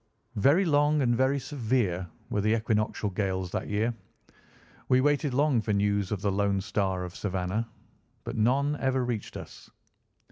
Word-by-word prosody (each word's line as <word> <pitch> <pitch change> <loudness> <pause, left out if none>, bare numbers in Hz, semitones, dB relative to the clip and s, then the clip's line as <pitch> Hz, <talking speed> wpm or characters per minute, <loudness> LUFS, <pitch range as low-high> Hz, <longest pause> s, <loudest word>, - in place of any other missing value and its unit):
Very 145 - +4
long 150 -1 +3
and 120 -1 +2
very 130 +3 +2
severe 110 - -1 0.2
were 105 - +1
the 110 +2 +2
equinoctial 110 -1 -1
gales 95 -2 -2
that - - -3
year. 110 +3 0 1.0
We 130 -1 +5
waited 145 +1 +2
long 135 -2 +2
for 110 -1 -1
news 100 -1 +1
of 105 -3 -2
the 100 - +2
Lone 100 0 +1
Star 95 -2 -1
of 90 -1 -7
Savannah, 95 +3 -2 0.5
but - - -5
none 135 +7 +2
ever 130 -1 +1
reached 120 -4 -4
us. - - -11
110 Hz, 155 wpm, -28 LUFS, 100-130 Hz, 1.0 s, We